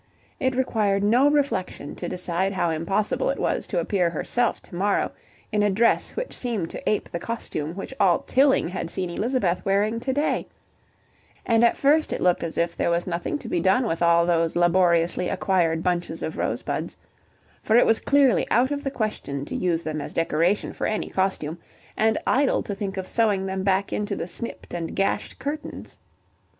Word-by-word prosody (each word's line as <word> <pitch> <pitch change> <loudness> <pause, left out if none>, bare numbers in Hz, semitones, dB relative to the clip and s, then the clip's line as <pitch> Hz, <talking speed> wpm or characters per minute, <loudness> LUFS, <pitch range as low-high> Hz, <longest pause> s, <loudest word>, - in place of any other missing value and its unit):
It 260 -1 0
required 210 -6 +1
no 245 +7 +4
reflection 275 - -1
to - - -4
decide 180 +2 -1
how 175 -3 0
impossible 195 - 0
it - - -1
was - - -1
to 190 - -3
appear 175 +1 +1
herself 205 +9 0
to - - -14
morrow 200 +3 0 0.4
in 210 -1 +1
a 205 - +3
dress 220 +4 +2
which - - -4
seemed 220 -9 -2
to - - -7
ape 210 - 0
the 170 - -3
costume 170 -7 -4
which 195 +6 -6
all 190 -4 +4
Tilling 270 -5 +3
had 180 -2 -4
seen 180 -1 -3
Elizabeth 205 -3 0
wearing 205 +4 +1
to 265 +3 -2
day, 290 +3 0 1.0
and 230 -1 +3
at 235 - +4
first 300 +3 +3
it - - -2
looked 180 -1 +2
as 165 - -4
if 170 0 0
there - - 0
was 170 0 0
nothing 175 - -2
to 265 - -9
be 175 - 0
done 190 +9 +3
with 165 -7 -2
all 170 0 +4
those 165 -1 +1
laboriously 175 0 +3
acquired 170 -4 +1
bunches 175 -2 -1
of 160 - -4
rosebuds; - - -3 0.6
for 220 - +1
it 240 - +6
was 225 - +3
clearly 280 -3 +3
out 255 +4 +3
of 285 0 -2
the 275 - -1
question 210 - -3
to - - -6
use 170 -2 0
them 155 -1 -3
as - - -7
the - - +2
decoration 170 +6 0
for - - -2
any 215 - -2
costume, 175 -4 -1 0.4
and 220 0 +2
idle 275 +1 +2
to 205 - -4
think 195 -1 -4
of 185 -1 -4
sewing 210 -4 +2
them 190 0 -2
back 195 0 +1
into 210 - -2
the - - -4
snipped 185 +7 -5
and 170 -1 -4
gashed 195 0 -1
curtains. 285 +4 -6
195 Hz, 190 wpm, -24 LUFS, 170-235 Hz, 1.0 s, it